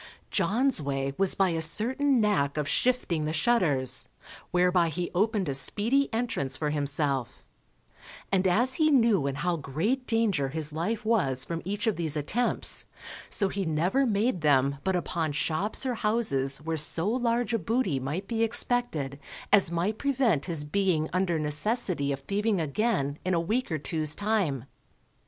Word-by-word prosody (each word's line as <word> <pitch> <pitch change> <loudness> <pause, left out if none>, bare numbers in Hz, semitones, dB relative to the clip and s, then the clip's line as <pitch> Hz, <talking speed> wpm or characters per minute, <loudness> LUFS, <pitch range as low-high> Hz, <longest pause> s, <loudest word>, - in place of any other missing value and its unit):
John's 250 - +1
way 135 -1 -2
was 195 -1 +3
by 195 -1 +2
a 165 -1 -2
certain 255 - +3
nack 195 -10 +1
of 150 -1 -1
shifting 175 -6 0
the 155 - -2
shutters, 155 - +1 0.4
whereby 180 -1 +2
he 175 +2 -4
opened 205 +1 0
a 140 - -1
speedy 220 - +1
entrance 225 - -2
for 150 -1 -2
himself; 140 -4 -2 0.9
and 190 -1 +2
as 240 +8 +2
he 310 - +5
knew 230 - +3
in 135 - -2
how 175 +3 -1
great 170 - -2
danger 210 - +1
his 155 +1 -5
life 210 +8 -3
was 135 - +1
from 165 -1 -4
each 205 +4 -3
of 220 - 0
these 160 -3 -1
attempts, 225 - +1 0.4
so 200 - +1
he 195 +1 -3
never 175 - +1
made 210 -3 0
them 140 -2 +2
but 190 -1 0
upon 165 -3 -2
shops 185 - -1
or 255 - 0
houses 210 - 0
where 160 0 -2
so 165 +4 +3
large 235 0 0
a 230 - +1
booty 195 - -1
might 150 +9 -4
be 230 -1 -2
expected 225 - 0 0.3
as 195 -5 +5
might 180 +6 -1
prevent 255 - +1
his 165 -5 -2
being 160 -1 0
under 180 -2 0
necessity 150 - 0
of 140 0 -4
thieving 205 +6 -1
again 155 -3 -1
in 185 0 0
a - - +2
week 215 +7 -2
or 160 - 0
two's 155 0 -1
time. 200 - -1
180 Hz, 165 wpm, -27 LUFS, 150-225 Hz, 0.9 s, he